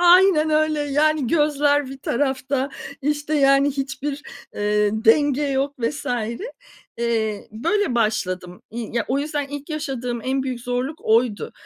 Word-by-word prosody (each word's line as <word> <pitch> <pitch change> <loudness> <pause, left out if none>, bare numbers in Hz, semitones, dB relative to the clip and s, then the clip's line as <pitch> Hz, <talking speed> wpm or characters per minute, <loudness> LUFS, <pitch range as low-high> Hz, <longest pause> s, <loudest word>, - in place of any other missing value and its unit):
Aynen 350 -3 +6
öyle. 310 0 +2
Yani, 295 0 +2
gözler 290 -1 +2
bir 270 +1 -8
tarafta, 265 +1 -1 0.3
işte, 295 +1 -1
yani, 275 0 +4
hiçbir, 275 +1 -4 0.3
eee, 210 0 +1
denge 270 +6 +3
yok 275 0 0
vs. 280 +6 -2 0.9
Eee, 225 -3 -1
böyle 335 - 0
başladım, 185 -6 -1
i 230 -1 -5
ya 230 - +1
o 265 - +1
yüzden 290 -1 -2
ilk 290 0 -7
yaşadığım 255 -6 -3
en 265 +1 0
büyük 255 -2 -4
zorluk 250 +5 -3
oydu. 225 -1 +1
275 Hz, 135 wpm, -22 LUFS, 235-295 Hz, 0.9 s, Aynen